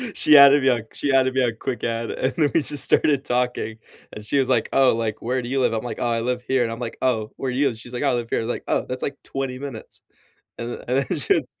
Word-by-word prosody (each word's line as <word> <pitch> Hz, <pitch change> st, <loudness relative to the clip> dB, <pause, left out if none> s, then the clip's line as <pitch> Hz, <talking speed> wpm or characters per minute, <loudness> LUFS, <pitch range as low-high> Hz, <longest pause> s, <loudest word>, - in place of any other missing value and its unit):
She 150 Hz, -, +5 dB
added 140 Hz, 0 st, +8 dB
me 135 Hz, -, +4 dB
on 120 Hz, -2 st, +1 dB
she 140 Hz, -1 st, -1 dB
added 130 Hz, -1 st, +3 dB
me 130 Hz, -, +3 dB
on 120 Hz, -, +1 dB
Quick 125 Hz, -, -4 dB
Add, 115 Hz, 0 st, -2 dB
and 130 Hz, -, -2 dB
then 150 Hz, -4 st, +2 dB
we 165 Hz, -, +4 dB
just 145 Hz, 0 st, +2 dB
started 140 Hz, -3 st, +3 dB
talking, 125 Hz, -3 st, -2 dB, 0.3 s
and 105 Hz, -, -9 dB
she 140 Hz, +6 st, +1 dB
was, 130 Hz, -, 0 dB
like, 120 Hz, -4 st, +2 dB
"Oh, 130 Hz, -3 st, +4 dB
like, 110 Hz, -2 st, -3 dB
where 125 Hz, +2 st, -1 dB
do -, -, -6 dB
you 135 Hz, +1 st, 0 dB
live?" 125 Hz, -, +1 dB
I'm, 110 Hz, -, -2 dB
like, 120 Hz, -, -6 dB
"Oh, -, -, 0 dB
I 115 Hz, -1 st, 0 dB
live 125 Hz, +1 st, -2 dB
here," 130 Hz, -2 st, +2 dB
and 115 Hz, -, -2 dB
I'm, 115 Hz, -, -6 dB
like, 120 Hz, -2 st, -6 dB
"Oh, 110 Hz, -4 st, 0 dB
where 130 Hz, -1 st, -3 dB
do 125 Hz, -, -4 dB
you 145 Hz, -, +2 dB
live?" -, -, -1 dB
and -, -, -13 dB
she's, 120 Hz, +1 st, -12 dB
like, 125 Hz, -, -4 dB
"Oh, 140 Hz, -, +2 dB
I -, -, +1 dB
live 120 Hz, -1 st, -3 dB
here." -, -, 0 dB
I -, -, -2 dB
was, -, -, -5 dB
like, -, -, -5 dB
"Oh, -, -, 0 dB
that's, 125 Hz, 0 st, -4 dB
like, 140 Hz, -, -3 dB
20 135 Hz, -2 st, -5 dB
minutes," 135 Hz, -5 st, -8 dB, 0.6 s
and 120 Hz, +1 st, -5 dB
the -, -, -9 dB
and 135 Hz, +2 st, +1 dB
then 180 Hz, -, -3 dB
she 120 Hz, -, +2 dB
125 Hz, 310 wpm, -22 LUFS, 115-135 Hz, 0.6 s, added